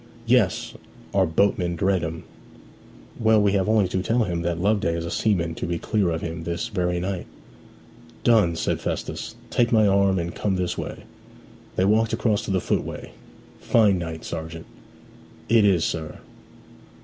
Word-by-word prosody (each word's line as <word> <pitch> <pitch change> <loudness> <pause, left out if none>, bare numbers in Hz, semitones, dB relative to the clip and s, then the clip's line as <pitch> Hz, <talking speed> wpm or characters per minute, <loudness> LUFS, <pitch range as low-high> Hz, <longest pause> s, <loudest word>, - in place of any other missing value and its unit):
'Yes. - - +2 0.4
Our 95 -2 +3
boatmen 90 0 +1
dread 95 0 +1
'em.' 80 +1 -5 1.0
'Well, 110 -1 +4
we 100 -1 +3
have 100 0 +1
only 110 -3 +3
to 95 - -1
tell 115 +5 +1
him 85 -4 -2
that 85 -1 -2
Loveday 95 -3 +1
is 85 0 -3
a 85 - -5
seaman 85 -7 0
to - - -4
be 85 0 -1
clear 100 0 0
of 80 -1 -2
him 80 0 -5
this 85 +7 -3
very 90 -4 -1
night.' 95 0 -3 1.0
'Done!' 105 -8 +4
said - - -1
Festus. - - -4 0.2
'Take 120 -1 +2
my 110 -2 +5
arm 100 -1 +3
and 85 0 -3
come 100 -2 -1
this 90 -1 -1
way.' - - -6 0.7
They 95 - +2
walked 110 +2 +2
across 110 -2 +1
to - - -6
the 95 - +2
footway. - - -3 0.5
'Fine 105 -5 +3
night, 80 -2 -6
sergeant.' 80 0 -6 0.8
'It 115 -1 +5
is, 95 -5 +3
sir.' 80 -2 -4
95 Hz, 165 wpm, -24 LUFS, 85-105 Hz, 1.0 s, my